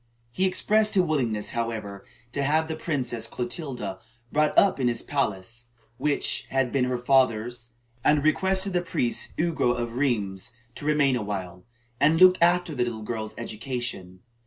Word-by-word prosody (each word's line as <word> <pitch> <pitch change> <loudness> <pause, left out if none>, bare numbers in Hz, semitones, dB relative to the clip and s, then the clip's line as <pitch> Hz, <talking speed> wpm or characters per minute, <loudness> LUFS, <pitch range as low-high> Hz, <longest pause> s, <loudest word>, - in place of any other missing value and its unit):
He 190 +8 +1
expressed 210 +3 +2
a 185 - +6
willingness, 125 -10 -1
however, 110 -4 -4 0.3
to 140 - -2
have 155 +3 +2
the 160 - -3
Princess 130 -8 -2
Clotilda 120 - -5 0.3
brought 150 0 +1
up 195 -7 +5
in 130 - +2
his 120 - -1
palace, 120 -3 -3 0.3
which 150 -1 0
had 135 -2 +1
been 135 -2 +2
her 125 0 -1
father's, 120 -2 +1 0.3
and 150 -1 +3
requested 190 +4 +2
the 175 - +2
priest 125 -8 -2
Ugo 160 -7 +1
of 120 -1 -3
Rheims 115 -5 -1 0.2
to 145 - -8
remain 145 -3 +3
awhile, 95 -5 -5 0.3
and 155 +3 +4
look 185 -1 +7
after 175 -1 +3
the 125 -3 0 0.2
girl's 110 -1 -5
education. 115 -6 -6
125 Hz, 150 wpm, -26 LUFS, 115-155 Hz, 0.3 s, look